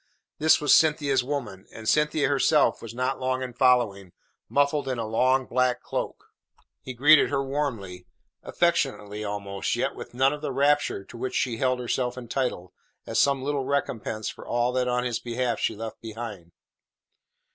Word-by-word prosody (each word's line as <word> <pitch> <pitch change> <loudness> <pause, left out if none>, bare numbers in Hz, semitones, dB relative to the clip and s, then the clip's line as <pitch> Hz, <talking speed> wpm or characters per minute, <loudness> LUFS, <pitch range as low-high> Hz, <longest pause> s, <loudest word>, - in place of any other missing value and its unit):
This 155 +1 +5
was 150 -2 +4
Cynthia's 145 -4 +3
woman, 120 -8 -5
and 110 0 -9
Cynthia 150 +2 +2
herself 145 +2 +3
was 115 0 -8
not 130 +2 -1
long 130 0 -1
in 125 -1 -6
following, 115 -8 +2 0.4
muffled 145 0 +1
in 130 -2 -2
a 115 - -2
long, 130 +4 +2
black 125 0 +1
cloak. - - -4 0.6
He 130 - -8
greeted 145 +5 +6
her 140 -1 0
warmly 115 -11 -4 0.3
affectionately 105 +1 -1
almost 100 -1 -3
yet - - -1
with - - -10
none 135 +3 +3
of 150 - -7
the 150 - -3
rapture 140 -5 +1
to 110 - -12
which 130 +2 -4
she 120 -3 0
held 130 +1 +1
herself 125 0 -2
entitled 120 -6 -3 0.3
as - - -1
some 140 -2 +2
little 140 -1 -1
recompense 115 -6 -2
for - - -7
all 120 +1 0
that 125 0 0
on 125 0 0
his 120 -2 -2
behalf 120 -1 -2
she - - 0
left 110 +1 -7
behind. 110 -6 -8
125 Hz, 170 wpm, -26 LUFS, 115-140 Hz, 0.6 s, greeted